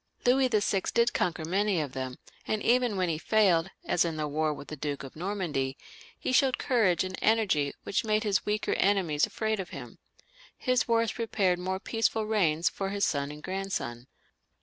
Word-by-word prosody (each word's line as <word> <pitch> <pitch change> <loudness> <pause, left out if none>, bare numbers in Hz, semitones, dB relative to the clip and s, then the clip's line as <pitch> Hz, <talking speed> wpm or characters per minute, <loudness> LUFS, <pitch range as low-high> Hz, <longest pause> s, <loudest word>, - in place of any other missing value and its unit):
Louis 260 +2 +4
VI. 210 -4 +1
did 235 0 +3
conquer 165 -3 -1
many 195 +2 +1
of 145 -4 -3
them, 130 -1 -5 0.3
and 215 -1 -1
even 240 -3 +2
when 185 -1 +1
he 160 -2 -1
failed, 190 -4 +3 0.2
as 175 - +2
in 165 -2 -2
his 155 - -1
war 155 +1 0
with 145 -1 -8
the 155 - -5
Duke 145 -1 -4
of 135 - -10
Normandy, 160 -7 -2 0.4
he - - -2
showed 260 0 +3
courage 215 -10 +2
and 185 0 -4
energy 200 -11 +2
which 200 - -1
made 215 -1 +1
his 205 -3 +1
weaker 210 0 -1
enemies 185 -7 +2
afraid 220 -1 -2
of 190 - -5
him. - - -9 0.6
His 255 -1 +1
wars 230 -1 +2
prepared 200 -6 0
more 190 +1 -2
peaceful 225 +1 0
reigns 175 -7 +2
for 195 -1 -2
his 200 0 +1
son 140 -1 -1
and 150 +1 -9
grandson. 185 -11 -4
190 Hz, 185 wpm, -29 LUFS, 155-220 Hz, 0.6 s, Louis